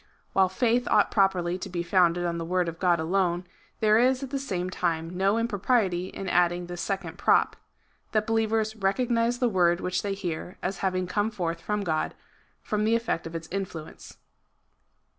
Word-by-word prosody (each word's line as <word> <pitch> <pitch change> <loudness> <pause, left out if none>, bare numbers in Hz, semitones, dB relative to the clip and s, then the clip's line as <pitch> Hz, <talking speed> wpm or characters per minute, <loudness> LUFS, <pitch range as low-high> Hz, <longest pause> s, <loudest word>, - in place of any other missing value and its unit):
While 190 -1 +4
faith 240 +5 +1
ought - - +4
properly 185 -3 +2
to - - -6
be 175 -1 -3
founded 175 -1 +3
on 170 -1 -1
the - - -3
word 180 +1 0
of 165 0 -5
God 175 -2 +3
alone, 175 +1 0 0.4
there 215 0 +5
is 255 +2 +3
at 265 - -6
the 275 - -1
same 185 -9 -3
time 170 -1 -2
no 195 +4 +2
impropriety 205 -4 +1
in 195 - -7
adding 175 0 +2
this 175 0 -6
second 195 -5 -4
prop, - - +3 0.3
— - - -40
that 215 -1 +1
be 225 - -1
lievers 220 -1 +1
recognise 235 +4 +1
the 245 - +2
word 175 -5 +3
which 185 0 -1
they 200 -1 -2
hear 180 -2 -5
as 185 +1 -2
having 185 -1 0
come 205 +4 0
forth 175 -6 -3
from 210 0 -2
God, 155 -4 -1 0.5
from 210 0 -1
the 225 +2 +3
efiect 230 -8 -1
of 165 - -9
its 165 -1 -5
influence. 175 -5 -6
185 Hz, 190 wpm, -27 LUFS, 175-215 Hz, 0.5 s, there